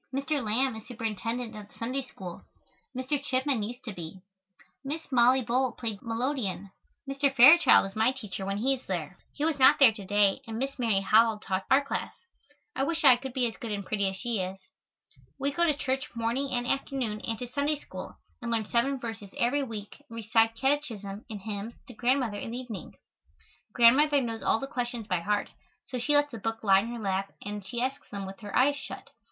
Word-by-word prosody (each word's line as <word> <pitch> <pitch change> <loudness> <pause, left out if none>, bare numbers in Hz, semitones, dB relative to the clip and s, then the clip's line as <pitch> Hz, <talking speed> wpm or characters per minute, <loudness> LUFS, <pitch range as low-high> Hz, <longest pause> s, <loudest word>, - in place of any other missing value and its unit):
Mr. 275 +1 -1
Lamb 235 +3 +1
is 220 - -10
Superintendent 230 0 -4
of 210 -1 -9
the - - -23
Sunday 255 +4 -2
School. 190 -8 -9 0.5
Mr. 260 +3 -1
Chipman 260 -3 0
used 245 +5 -6
to 220 - -6
be. 180 +1 -9 0.6
Miss 295 +2 -5
Mollie 255 +1 +5
Bull 250 +2 +1
played 225 -4 -4
the - - -15
melodeon. 225 -5 -2 0.4
Mr. 275 0 +1
Fairchild 275 - +8
is 195 - -8
my 220 +3 +3
teacher 210 -8 -6
when 195 +1 -2
he 260 +6 +2
is 265 - -6
there. 180 -1 -4
He 295 - -2
was 315 -3 0
not 260 - +7
there 270 -5 +8
to 210 -2 -9
day 205 +3 +2
and 225 -1 -5
Miss 270 +2 -3
Mary 220 -5 +2
Howell 220 +2 +4
taught 190 -2 -3
our 275 +2 +4
class. - - -3 0.6
I - - -1
wish 330 +3 -1
I 260 -3 +9
could 265 +2 -7
be 255 -1 +1
as 230 - -4
good 230 - -6
and 200 -1 -3
pretty 200 -1 0
as 190 - -6
she 235 +1 -2
is. 185 +1 -4 0.8
We 280 +1 -1
go 340 +5 +1
to 300 -3 +1
church 265 +1 -1
morning 235 +4 -1
and 245 -2 -1
afternoon 250 -5 -2
and 225 -1 -3
to 245 - -6
Sunday 285 +4 0
School, - - -9 0.2
and 235 - -4
learn 225 -2 0
seven 255 +5 +1
verses 225 -4 -6
every 250 +5 +2
week 220 -6 -6
and 230 - -10
recite 225 0 +2
catechism 225 -7 -2
and 210 -3 -6
hymns 210 +2 -5
to 250 - -11
Grandmother 240 -3 0
in - - -5
the 235 - -5
evening. 245 -6 -7 0.8
Grandmother 280 +5 +5
knows 230 -3 -3
all - - +2
the 270 - -4
questions 240 -3 -4
by 180 -4 0
heart, 205 +4 -1 0.3
so 250 - -5
she 295 +5 +1
lets 290 0 +4
the 230 - -7
book 225 +2 -3
lie 195 -2 +6
in 215 - -3
her 240 0 -5
lap 195 -2 -2
and 205 0 -5
she 215 +5 -5
asks 270 +2 -4
them 200 -1 -5
with 195 +2 -9
her 205 -3 -7
eyes 280 +3 +4
shut. 280 - -8
235 Hz, 215 wpm, -28 LUFS, 210-265 Hz, 0.8 s, I